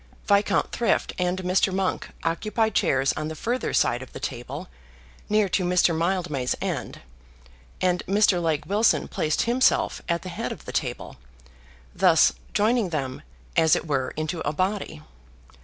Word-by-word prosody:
Viscount 200 0 +2
Thrift 235 - 0
and 180 +1 -1
Mr. 185 +2 +2
Monk 190 0 -1
occupied 215 +7 0
chairs 135 0 +2
on 155 - -4
the 160 - -5
further 245 +9 -2
side 120 +1 +2
of 130 - -11
the - - -7
table, 140 +8 -5 0.6
near 210 -1 +3
to 185 - +1
Mr. 180 -1 +3
Mildmay's 165 -6 -1
end, - - -4 0.8
and 180 -1 +1
Mr. 195 -2 +3
Legge 160 -2 0
Wilson 210 +3 +2
placed 155 -1 0
himself 245 +2 +2
at 170 0 0
the 185 - -6
head 175 - -4
of - - -9
the - - -6
table, - - -3 0.8
thus - - +5 0.2
joining 220 -1 +2
them 140 -4 -3 0.3
as 160 -2 +5
it - - -3
were 135 -4 -1
into 155 +2 -2
a 150 - -1
body. 185 - -2
180 Hz, 155 wpm, -25 LUFS, 155-200 Hz, 0.8 s, thus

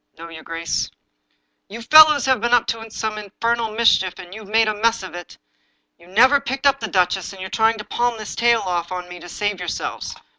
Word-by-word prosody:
" - - -54
" - - -44
No, 165 +1 -10
your 160 -1 -10
grace." 165 +1 -3 0.4
" - - -48
You 230 +3 -8
fellows 305 +1 +7
have 260 -4 +1
been 240 +1 +3
up 240 - +2
to 225 0 -10
some 215 0 -4
infernal 230 +3 -2
mischief. 215 -5 +2
You 185 +4 -10
have 205 - -14
made 225 +1 +3
a 215 - 0
mess 225 0 0
of 185 -3 -9
it. 175 -1 -10 0.6
You 170 - -19
never 255 +9 +4
picked 270 0 -5
up 275 0 +3
the 220 - -4
duchess, 185 -1 0
and 195 - -13
you're 190 0 -7
trying 225 0 +2
to 210 - -7
palm 240 +2 -1
this 215 -1 -7
tale 235 -1 +2
off 175 -2 -3
on 180 -1 -5
me 180 0 -10
to 175 +1 -12
save 205 +1 -3
yourselves." 180 -1 -5
215 Hz, 235 wpm, -20 LUFS, 180-235 Hz, 0.6 s, fellows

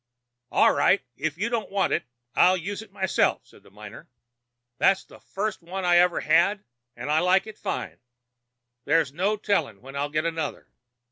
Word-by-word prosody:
"'All - - +4
right. - - +3
If 155 +2 -3
you 215 +5 -1
don't 235 -2 -2
want 195 -1 0
it - - -1 0.3
I'll 185 +1 +5
use 200 +5 -5
it 220 - -14
myself,' 190 -2 0
says - - -20
the - - -20
miner. - - -12 0.7
'It's 195 0 +3
the - - -16
first 205 0 -4
one 185 +2 -5
I 175 0 +5
ever 175 0 +3
had, 200 +6 +3 0.3
and 150 - -4
I 155 - +4
like 185 +2 +3
it 220 -1 -11
fine. - - -4 0.9
There's 150 -2 +2
no 195 +6 0
telling 165 - -1
when 135 +1 -10
I'll 145 +1 -1
get 155 +2 -1
another.' 165 -3 -3
180 Hz, 180 wpm, -25 LUFS, 155-200 Hz, 0.9 s, I'll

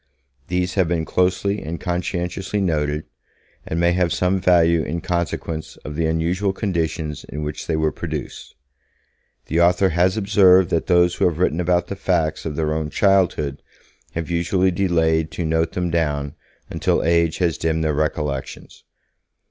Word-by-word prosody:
These 90 0 -1
have 95 -4 +2
been 85 -1 -1
closely 95 +4 0
and 80 +2 -5
conscientiously 90 +2 -2
noted, 75 -5 0 0.6
and 80 - -2
may 85 0 +3
have 90 -1 +1
some 90 +1 +1
value 85 -2 +4
in 80 +3 -3
consequence 85 -2 -3
of 75 - -6
the 80 +1 0
unusual 85 +5 0
conditions 80 -6 -2
in 75 +1 -5
which 75 0 -5
they 80 - 0
were 80 0 +1
produced. - - -6 0.9
The 80 +3 +1
author 90 +2 +4
has 90 +4 +2
observed 95 -3 +5
that 85 - 0
those 90 -1 +4
who - - 0
have 85 -3 +1
written 85 -2 +1
about 90 0 +1
the 100 - -6
facts 85 -5 -1
of 75 - -4
their 75 -1 0
own 80 -1 -2
childhood 85 -8 +1 0.5
have 85 +1 -4
usually 90 +2 +1
delayed 80 -3 +1
to 85 - -3
note 80 +1 0
them 90 -1 -2
down 75 -4 -1 0.3
until - - 0
age 85 -1 +2
has 85 -3 0
dimmed 80 0 0
their 80 -1 +1
recollections. 75 -2 -3
85 Hz, 160 wpm, -21 LUFS, 80-90 Hz, 0.9 s, observed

